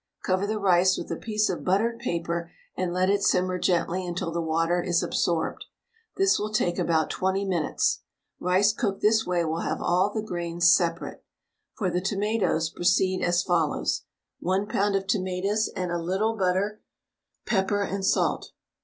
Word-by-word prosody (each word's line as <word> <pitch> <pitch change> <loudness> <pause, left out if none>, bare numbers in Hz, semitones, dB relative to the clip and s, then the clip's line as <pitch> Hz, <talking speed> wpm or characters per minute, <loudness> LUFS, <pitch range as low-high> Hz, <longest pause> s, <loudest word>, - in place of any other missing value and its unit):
Cover 185 +2 0
the 215 +1 -1
rice 190 -2 +3
with - - -6
a - - -1
piece 215 -1 0
of 180 - -3
buttered 225 +5 +1
paper 170 -5 -3 0.2
and 185 -1 -2
let 185 +1 +1
it 200 +1 +2
simmer 185 -1 +1
gently 180 +1 0
until 175 -1 -3
the 170 +1 -2
water 165 +2 +1
is 175 -1 +1
absorbed. 165 -2 -1 0.5
This 390 0 +3
will 210 +1 -3
take 175 -5 0
about 160 -2 +1
20 190 +1 -1
minutes. 175 -5 0 0.4
Rice 190 +4 +3
cooked 200 -2 -2
this 220 0 +3
way 175 -2 +1
will 160 +1 -2
have - - -2
all 185 +4 +2
the 215 0 -3
grains 170 -4 +2
separate. 170 -2 -2 0.5
For 190 -6 -1
the 180 - 0
tomatoes 195 -4 0
proceed 185 +1 +1
as 175 0 +2
follows: 170 -4 0 0.4
1 190 +3 0
lb. 205 -1 +1
of 195 - -4
tomatoes 195 +2 0
and 180 -2 -2
a 175 - -1
little 195 +6 0
butter, 195 +2 0 0.6
pepper, 200 -1 +1
and 195 0 -3
salt. - - 0
185 Hz, 165 wpm, -26 LUFS, 175-200 Hz, 0.6 s, rice